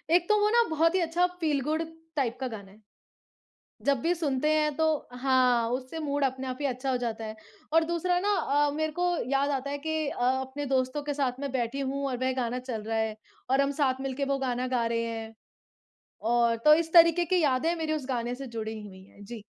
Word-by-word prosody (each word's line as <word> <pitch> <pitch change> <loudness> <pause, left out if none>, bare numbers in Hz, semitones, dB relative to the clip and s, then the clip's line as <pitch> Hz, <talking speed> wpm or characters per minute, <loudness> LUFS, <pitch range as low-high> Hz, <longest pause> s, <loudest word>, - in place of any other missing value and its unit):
एक 350 -1 +3
तो 425 - +5
वो 420 0 +3
ना 475 +1 +5
बहुत 325 +2 +2
ही - - +3
अच्छा 340 +2 +2
फ़ील 300 -4 +1
गुड 310 +4 -1 0.3
टाइप 250 -4 0
का 260 - -2
गाना 200 -4 -8
है। 210 - -19 1.1
जब 280 -2 +3
भी 345 +2 +2
सुनते 300 -3 0
हैं 305 -1 +2
तो 320 0 +2 0.3
हाँ, 250 -2 +2
उससे 255 +5 -4
मूड 285 -2 -1
अपने 260 0 -2
आप 255 +1 -4
ही 285 - +1
अच्छा 260 +1 -2
हो 255 - +1
जाता 225 -2 -3
है। 215 0 -6 0.4
और 325 0 +5
दूसरा 345 +2 0
ना 405 - -1
अ, 290 +1 +2
मेरे 315 0 -1
को 355 +3 0 0.2
याद 280 +1 +2
आता 275 0 -2
है 285 - -3
कि 315 0 -2
अ, - - -5
अपने 265 +2 -1
दोस्तों 260 +2 0
के 290 0 -3
साथ 265 -2 -1
मैं 280 -2 -4
बैठी 255 +2 -1
हूँ 275 +1 -2
और 250 - -2
वह 260 - +1
गाना 240 +2 -2
चल 245 -4 -5
रहा 225 +1 -2
है 220 -1 -1 0.3
और 270 +1 +4
हम 280 0 +2
साथ 265 -1 +2
मिलके 270 +1 -2
वो - - -1
गाना 255 -1 -1
गा 240 -2 0
रहे 230 0 0
हैं, 225 -1 -5 0.9
और 235 +1 +2
तो 300 0 +9
इस 325 0 -1
तरीके 335 0 +7
की 360 +1 +2
यादें 295 +4 +2
मेरी 315 -1 -2
उस 285 -4 -4
गाने 240 -1 -1
से 270 +1 -7
जुड़ी 220 -2 -5
हुई 190 -2 -12
हैं। 200 +1 -15
जी। 225 0 -8
270 Hz, 230 wpm, -28 LUFS, 245-310 Hz, 1.1 s, तो